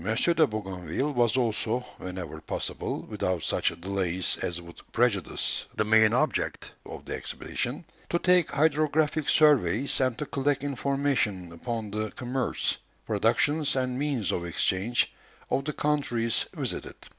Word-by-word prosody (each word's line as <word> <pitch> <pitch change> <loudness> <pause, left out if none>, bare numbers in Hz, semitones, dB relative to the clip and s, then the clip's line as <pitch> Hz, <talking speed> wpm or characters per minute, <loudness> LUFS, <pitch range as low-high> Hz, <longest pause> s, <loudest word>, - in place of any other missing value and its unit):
de 145 - +3
Bougainville 95 - -3
was 120 -1 +3
also, 120 0 0 0.2
whenever 90 -4 -6
possible, - - -3
without 90 -3 -2
such - - +2
delays 95 -1 0
as 85 0 -2
would 85 -1 -12
prejudice 115 -6 +1
the - - +2
main 110 0 +5
object 125 - 0 0.2
of - - -9
the - - -4
expedition, - - -3 0.2
to 170 - +2
take 180 -2 +3
hydrographic 155 0 +2
surveys, 135 - +4
and 130 -3 +1
to 150 - -3
collect 140 0 0
information 135 -9 0
upon 110 +4 -4
the 110 +1 -2
commerce, 125 0 -1 0.3
productions, 150 -1 +2
and 130 -1 -1
means 135 - 0
of 85 - -2
exchange, 95 +6 +1 0.4
of 135 - +1
the 150 - -2
countries 130 -7 +1
visited. - - -3
120 Hz, 135 wpm, -27 LUFS, 95-140 Hz, 0.4 s, main